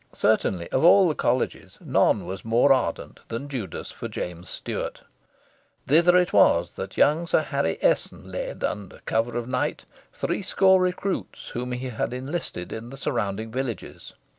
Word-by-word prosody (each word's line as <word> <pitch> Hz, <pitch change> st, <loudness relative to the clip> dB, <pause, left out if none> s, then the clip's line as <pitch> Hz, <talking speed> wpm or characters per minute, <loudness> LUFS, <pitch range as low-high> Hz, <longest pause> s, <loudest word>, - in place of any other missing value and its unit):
Certainly, 85 Hz, -3 st, +1 dB
of 130 Hz, -, +1 dB
all 185 Hz, +2 st, +7 dB
the 160 Hz, -, +1 dB
Colleges 125 Hz, -3 st, -1 dB
none -, -, +2 dB
was 95 Hz, +1 st, -6 dB
more 120 Hz, +5 st, +4 dB
ardent 105 Hz, -11 st, -2 dB
than 115 Hz, +5 st, -5 dB
Judas 120 Hz, -, -5 dB
for -, -, -6 dB
James 90 Hz, 0 st, -6 dB
Stuart. -, -, -5 dB, 0.8 s
Thither 170 Hz, +5 st, +5 dB
it 180 Hz, -1 st, +2 dB
was 85 Hz, +1 st, +4 dB
that 95 Hz, 0 st, -7 dB
young 160 Hz, +4 st, +3 dB
Sir 155 Hz, -, +3 dB
Harry 140 Hz, -, -1 dB
Esson -, -, 0 dB
led, -, -, -4 dB
under 100 Hz, -3 st, -4 dB
cover 115 Hz, +2 st, 0 dB
of 120 Hz, -1 st, -3 dB
night, 125 Hz, 0 st, -2 dB, 0.3 s
three -, -, -2 dB
score 190 Hz, -1 st, +4 dB
recruits 185 Hz, +1 st, -2 dB
whom 125 Hz, +1 st, -4 dB
he 125 Hz, +1 st, -4 dB
had 120 Hz, +1 st, -3 dB
enlisted 130 Hz, -, -5 dB
in 115 Hz, +2 st, -7 dB
the 135 Hz, -, -9 dB
surrounding 110 Hz, -3 st, -2 dB
villages. 125 Hz, -2 st, -5 dB
125 Hz, 160 wpm, -25 LUFS, 110-155 Hz, 0.8 s, all